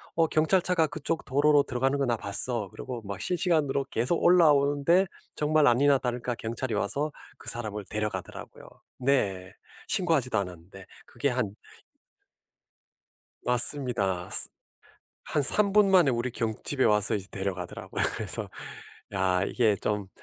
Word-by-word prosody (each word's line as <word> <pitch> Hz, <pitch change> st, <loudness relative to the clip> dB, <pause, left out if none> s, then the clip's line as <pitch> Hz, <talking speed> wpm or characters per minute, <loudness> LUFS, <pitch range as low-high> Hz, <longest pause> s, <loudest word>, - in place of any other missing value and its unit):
"어 165 Hz, -1 st, +2 dB
경찰차가 170 Hz, +1 st, +1 dB
그쪽 155 Hz, +2 st, -4 dB
도로로 145 Hz, +2 st, +2 dB
들어가는 135 Hz, +2 st, -2 dB
거 140 Hz, -, 0 dB
나 120 Hz, -2 st, 0 dB
봤어." 105 Hz, +1 st, +1 dB
그러고 125 Hz, -3 st, -8 dB
막 100 Hz, -1 st, -7 dB
실시간으로 155 Hz, -6 st, -1 dB
계속 125 Hz, +9 st, -1 dB
올라오는데 155 Hz, +1 st, +3 dB, 0.3 s
정말 150 Hz, 0 st, +1 dB
아니나 135 Hz, +3 st, +3 dB
다를까 125 Hz, -1 st, -4 dB
경찰이 115 Hz, +1 st, -5 dB
와서 145 Hz, +8 st, -2 dB, 0.3 s
그 -, -, -2 dB
사람을 105 Hz, -4 st, -2 dB
데려가더라고요. 105 Hz, 0 st, -5 dB, 0.3 s
네. 100 Hz, -9 st, -1 dB, 0.4 s
신고하지도 155 Hz, -, +1 dB
않았는데 90 Hz, 0 st, -8 dB, 0.2 s
그게 140 Hz, -, -2 dB
한 120 Hz, -6 st, -3 dB, 1.9 s
맞습니다. 120 Hz, -8 st, +3 dB
습 -, -, +8 dB, 0.7 s
한 150 Hz, -, -1 dB
3 205 Hz, -2 st, +4 dB
분 210 Hz, -1 st, +4 dB
만에 175 Hz, -7 st, +4 dB
우리 120 Hz, +1 st, -2 dB
경 115 Hz, -3 st, -2 dB
집에 135 Hz, -3 st, +1 dB
와서 105 Hz, -1 st, +2 dB
이제 100 Hz, -2 st, -5 dB
데려가더라고요. 95 Hz, -2 st, -5 dB
그래서 -, -, -1 dB, 0.7 s
야 95 Hz, -1 st, +1 dB
이게 110 Hz, -2 st, 0 dB
좀 105 Hz, -1 st, -4 dB
125 Hz, 305 characters per minute, -26 LUFS, 105-150 Hz, 1.9 s, 습